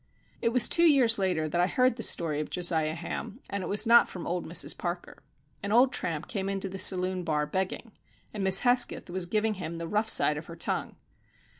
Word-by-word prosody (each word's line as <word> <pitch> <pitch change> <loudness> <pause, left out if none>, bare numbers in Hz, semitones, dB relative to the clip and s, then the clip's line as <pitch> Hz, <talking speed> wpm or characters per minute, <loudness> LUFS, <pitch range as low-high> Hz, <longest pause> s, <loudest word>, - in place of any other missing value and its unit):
It 230 - +1
was 245 0 +4
two 335 - +1
years 250 -8 +4
later 180 -5 -1
that 175 +3 -1
I 180 - +2
heard 255 +3 +1
the 230 - -7
story 155 -8 0
of 150 - -5
Josiah 160 -3 -1
Ham, 170 +6 -7
and 200 - -3
it - - -5
was 210 +3 +3
not 235 +1 +5
from 180 - -8
old 175 0 -4
Mrs 170 - +2
Parker. 175 0 -7 0.4
An 200 - -5
old 250 +3 +4
tramp 165 -3 -3
came 195 -3 -4
into 195 0 -2
the 195 0 -7
saloon 185 -1 +2
bar 150 -2 -1
begging, 190 +7 -4 0.4
and 205 -2 -4
Miss 190 0 +4
Hesketh 245 -6 +1
was 180 -1 -2
giving 215 +3 0
him 165 0 -6
the 165 0 -6
rough 210 +4 -1
side 150 - +3
of 150 - -9
her 165 - -10
tongue. 165 - -3
190 Hz, 215 wpm, -27 LUFS, 170-220 Hz, 0.4 s, not